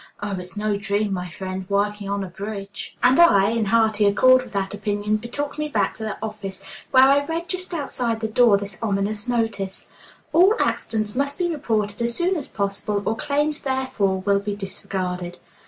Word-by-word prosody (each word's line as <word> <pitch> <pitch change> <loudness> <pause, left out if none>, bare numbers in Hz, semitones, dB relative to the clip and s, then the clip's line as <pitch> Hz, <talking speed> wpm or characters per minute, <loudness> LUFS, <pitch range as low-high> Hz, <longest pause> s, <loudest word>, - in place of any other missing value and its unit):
Oh, 205 0 -4
it's 180 +3 -9
no 210 -1 0
dream, 205 0 -1
my 180 -1 -3
friend, 185 +1 -6
working 200 0 0
on 200 0 -1
a - - -5
bridge!" 200 +2 -7
And 255 +4 +5
I, 205 - +6
in 230 -1 0
hearty 220 -1 +3
accord 255 +5 +6
with 255 - -11
that 195 0 -1
opinion, 205 +1 -1
betook 280 +7 -4
me 300 - -1
back 210 -9 0
to 220 - -6
the 215 -1 -3
office, 200 -3 -5 0.3
where 260 -1 +7
I 280 +2 +5
read 330 +3 -3
just 370 0 -3
outside 250 -8 -2
the 220 - -1
door 220 -1 +5
this 200 0 -7
ominous 205 +1 -1
notice: 225 -5 -2 0.4
"All 370 +6 +6
accidents 215 -2 -1
must 280 +2 0
be 350 -1 0
reported 220 -8 -1
as 235 0 0
soon 360 +2 +1
as 300 -6 -3
possible, 200 0 -2
or 220 - +1
claims 295 +4 0
therefor 260 -8 -1
will 200 +1 +2
be 205 0 -3
disregarded." 185 -3 -4
215 Hz, 190 wpm, -23 LUFS, 200-255 Hz, 0.4 s, where